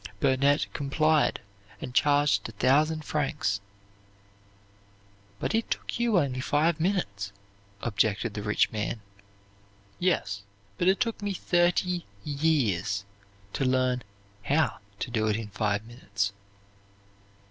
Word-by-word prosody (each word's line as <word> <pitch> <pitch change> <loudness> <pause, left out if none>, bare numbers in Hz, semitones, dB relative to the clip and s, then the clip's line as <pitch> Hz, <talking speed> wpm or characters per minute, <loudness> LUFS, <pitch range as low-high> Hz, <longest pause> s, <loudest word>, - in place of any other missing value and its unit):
Burnett 140 +2 +3
complied 155 +2 +2 0.4
and 125 - -6
charged 145 -7 +3
a - - -10
thousand 150 +7 +2
francs. 145 -9 -1 1.8
"But - - -1
it 225 +1 0
took - - -3
you 235 -4 +3
only 135 -6 +1
five 155 +3 +2
minutes," 105 - -1 0.5
objected 110 0 +1
the 105 - -4
rich 105 0 +2
man. 110 +1 -3 1.0
"Yes, 100 - 0 0.4
but 175 - +2
it 190 +1 +4
took 230 -4 -1
me 205 -1 -2
thirty 175 0 +1 0.2
years 120 - +1 0.5
to - - -1
learn 130 -1 +2 0.4
how 150 +9 +1 0.2
to 120 - -4
do 110 -2 +1
it 105 - +2
in 110 -1 -4
five 105 +1 -1
minutes." 100 -4 -3
135 Hz, 115 wpm, -28 LUFS, 105-160 Hz, 1.8 s, it